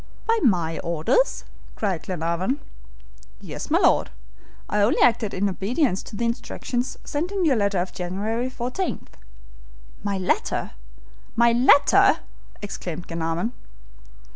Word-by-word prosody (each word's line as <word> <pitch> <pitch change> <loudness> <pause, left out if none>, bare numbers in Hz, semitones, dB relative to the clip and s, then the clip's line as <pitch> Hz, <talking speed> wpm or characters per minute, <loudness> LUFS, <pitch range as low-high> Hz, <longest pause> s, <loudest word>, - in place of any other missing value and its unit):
"By 455 0 +2
my 175 - +2
orders?" 170 - +1 0.3
cried 190 -6 -1
Glenarvan. 180 - -1 0.8
"Yes, - - -7
my 320 - +4
Lord. - - +3 0.6
I 210 - +1
only 205 +4 +3
acted 225 -4 +3
in 200 +2 0
obedience 200 - 0
to - - -10
the 235 - -1
instructions 245 +1 -3
sent 320 +6 -3
in 390 -3 0
your 285 -5 +4
letter 200 -3 +1
of 180 +1 -2
January 210 +7 -2
fourteenth." 255 +9 -4 0.9
"My 200 -1 -1
letter! 190 - -1 0.6
my 235 0 +5
letter!" 250 +4 +5 0.5
exclaimed 175 -4 -6
Glenarvan. 165 +6 -2
210 Hz, 120 wpm, -24 LUFS, 180-255 Hz, 0.9 s, my